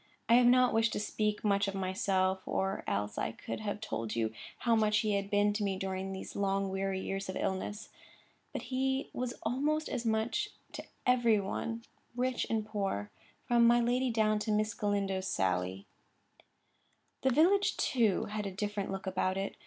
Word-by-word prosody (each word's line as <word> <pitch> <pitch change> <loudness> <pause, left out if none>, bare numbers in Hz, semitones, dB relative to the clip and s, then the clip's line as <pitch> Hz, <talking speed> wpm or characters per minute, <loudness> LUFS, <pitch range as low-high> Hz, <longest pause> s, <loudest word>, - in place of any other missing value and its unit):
I - - +5
have 245 0 +7
not 250 0 +5
wished 225 0 +2
to - - -1
speak 210 0 -1
much 200 -1 +2
of 195 - -3
myself, 190 -1 0
or 195 +1 -1
else 105 +1 -1
I - - -1
could - - -6
have 210 -1 -3
told 115 - -3
you 110 -1 0 0.2
how 235 -2 +2
much 215 -1 +3
he 215 -2 0
had 200 0 -1
been 205 0 +3
to 210 0 -1
me 195 -2 0
during 190 0 -3
these 190 - -7
long, 195 -1 0
weary 195 0 -1
years 195 0 -4
of 185 - -3
illness. 205 +3 -3 0.6
But - - -4
he 265 +1 -1
was 250 0 -3
almost 300 +6 0
as 240 - -2
much 225 - 0 0.2
to - - -6 0.2
every 240 -4 +4
one, 225 +4 -3 0.3
rich 250 0 0
and 220 -1 0
poor, 195 - -2 0.3
from 235 -1 +4
my 240 +1 +6
lady 250 +2 +1
down 215 -2 +2
to 215 +1 -2
Miss 215 0 +1
Galindo's 195 -2 -1
Sally. 95 - -1 1.4
The 265 - +3
village, 355 +10 +4
too, 225 -7 +2
had 210 -1 -3
a - - -4
different 205 +1 -3
look 195 +1 -4
about 185 0 0
it. 195 0 -3
210 Hz, 180 wpm, -32 LUFS, 195-235 Hz, 1.4 s, have